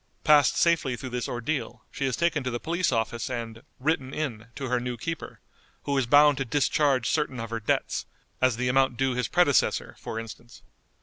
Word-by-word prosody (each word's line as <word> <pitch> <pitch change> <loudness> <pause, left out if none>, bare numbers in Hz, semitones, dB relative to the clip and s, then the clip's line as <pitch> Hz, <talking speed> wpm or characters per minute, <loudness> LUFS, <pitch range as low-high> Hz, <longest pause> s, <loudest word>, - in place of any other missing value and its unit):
Passed 150 -3 +5
safely 165 -7 +2
through 130 +1 -7
this 125 -1 -2
ordeal, 125 +5 -4
she 140 - -2
is 130 - -1
taken 170 -4 0
to 130 - -2
the 120 -1 -3
police 170 +3 0
office 115 +2 -1
and 115 -2 -5 0.2
"written 135 -1 -1
in" 115 -8 -4
to 135 - -4
her 125 0 +1
new 125 0 -4
keeper, 165 +7 -6 0.4
who 140 - -1
is 135 -3 +1
bound 145 +1 +6
to - - +1
discharge 135 -1 +1
certain 150 -5 -1
of 115 0 -6
her 115 - -2
debts, 105 - -1 0.3
as 130 -3 +3
the 125 +1 -1
amount 130 -1 +2
due 135 0 +1
his 125 0 -1
predecessor, 175 -6 +2
for 115 - -5
instance. 115 +1 -11
130 Hz, 195 wpm, -26 LUFS, 120-145 Hz, 0.4 s, bound